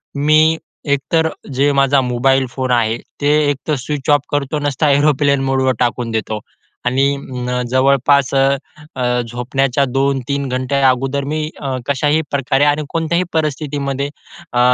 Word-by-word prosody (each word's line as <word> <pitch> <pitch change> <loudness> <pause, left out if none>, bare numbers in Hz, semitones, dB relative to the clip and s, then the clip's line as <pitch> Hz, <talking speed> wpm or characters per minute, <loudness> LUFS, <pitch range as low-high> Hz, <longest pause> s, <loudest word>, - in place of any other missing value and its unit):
मी 155 +3 +4 0.4
एक 140 - +1
तर 160 -1 +4 0.3
जे 140 +3 +2
माझा 140 0 +3
मोबाईल 130 +2 +2
फोन 130 -1 -2
आहे 115 -2 +2 0.2
ते 145 - +1 0.2
एकतर 145 +2 -1
स्विच 140 +2 -4
ऑफ 145 - +3
करतो 145 +1 -1
नसता 145 +1 0
एरोप्लेन 145 0 +3
मोडवर 130 -1 +1
टाकून 120 -1 -1
देतो. 110 -1 -2 0.5
आणि 130 +2 +2
अं, 125 -2 -4
जवळपास 135 +1 +3
अ, 135 +1 +3 0.4
अ, 125 -1 0
झोपण्याच्या 125 +3 0
2:00-3:00 135 +1 -1
घंटे 130 +2 -1
अगोदर 135 +2 +2
मी 155 +1 -2
अ, 135 -2 -2
कशाही 145 +2 +1
प्रकारे 135 0 +1
आणि 145 +1 +2
कोणत्याही 165 +2 0
परिस्थितीमध्ये 145 -3 -2 0.4
अ, 120 - +1
135 Hz, 145 wpm, -17 LUFS, 130-145 Hz, 0.5 s, मी